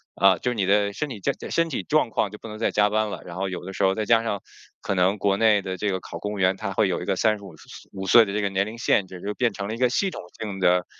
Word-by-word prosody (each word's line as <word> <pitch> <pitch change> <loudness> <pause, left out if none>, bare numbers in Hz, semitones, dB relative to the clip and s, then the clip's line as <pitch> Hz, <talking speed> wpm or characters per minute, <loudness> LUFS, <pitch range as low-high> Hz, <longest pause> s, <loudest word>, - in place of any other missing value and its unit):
啊 95 -2 +5
就 125 +8 -1
你 105 -5 0
的 100 +1 +3
身 150 - -3
体 120 -6 -7
健 - - 0 0.2
身 165 0 +1
体 145 - -3
状 155 -5 +2
况 105 - 0
就 105 - -9
不 - - -10
能 105 - -7
再 115 - +1
加 105 0 +3
班 110 0 0
了。 - - -6
然 85 - -8
后 95 +1 -1
有 90 - -6
的 95 - -6
时 100 - -2
候 95 - +3
再 110 - -1
加 115 +1 +4
上 105 -4 -2 0.4
可 - - -2
能 95 +3 +2
国 100 0 +1
内 110 -2 +4
的 95 -1 -4
这 105 +3 -1
个 95 - -2
考 - - -8
公 105 +3 -4
务 105 - -5
员， 95 0 +3
它 100 -1 -4
会 105 +1 +2
有 90 - -1
一 - - -5
个 - - 0
三 110 +2 +2
十 100 - -14
五 95 -3 -10 0.4
五 95 0 -5
岁 115 - +8
的 100 - -5
这 105 - 0
个 100 - +1
年 95 0 0
龄 110 +2 -8
限 105 -3 +2
制， 90 -1 -11
就 105 - -3
变 120 +1 +1
成 100 0 -5
了 110 - -3
一 - - -8
个 125 0 +3
系 195 +11 +1
统 - - -7 0.2
性 100 -3 -5
的， 90 0 +3
100 Hz, 355 characters per minute, -24 LUFS, 95-110 Hz, 0.4 s, 岁